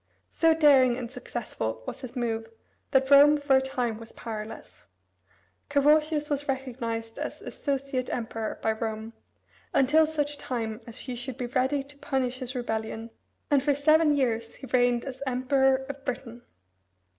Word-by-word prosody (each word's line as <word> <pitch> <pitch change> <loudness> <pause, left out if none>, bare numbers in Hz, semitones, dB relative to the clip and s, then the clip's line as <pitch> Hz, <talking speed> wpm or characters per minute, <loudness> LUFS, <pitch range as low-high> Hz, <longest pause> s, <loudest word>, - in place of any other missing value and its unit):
So 325 -1 +4
daring 270 -6 +5
and 245 -2 -5
successful 225 - -5
was - - -6
his 255 -3 -8
move 225 -2 -2 0.4
that 265 0 +2
Rome 290 +2 +8
for 285 -2 +3
a - - +3
time 245 -4 -2
was 230 0 -10
powerless. 220 -1 -8 0.8
Carausius 300 +1 +3
was 290 0 -2
recognized 235 -4 -3
as - - -4
"associate" 275 -2 -2
emperor 225 -2 -3
by 220 - +3
Rome, 220 0 -4 0.6
until 305 +4 +5
such 295 -2 -2
time 230 -4 -3
as 230 - -8
she 255 - -5
should 245 +1 -5
be 250 - -3
ready 260 +3 0
to 285 +1 -14
punish 255 -2 -1
his 255 0 -5
rebellion, 225 -1 -3 0.4
and 285 -2 +5
for 285 0 +2
seven 310 +1 +4
years 230 -4 -1
he - - -10
reigned 245 -1 +2
as 265 -1 -7
emperor 265 +1 +2
of 280 -1 -7
Britain. 245 -2 -5
255 Hz, 155 wpm, -27 LUFS, 230-280 Hz, 0.8 s, Rome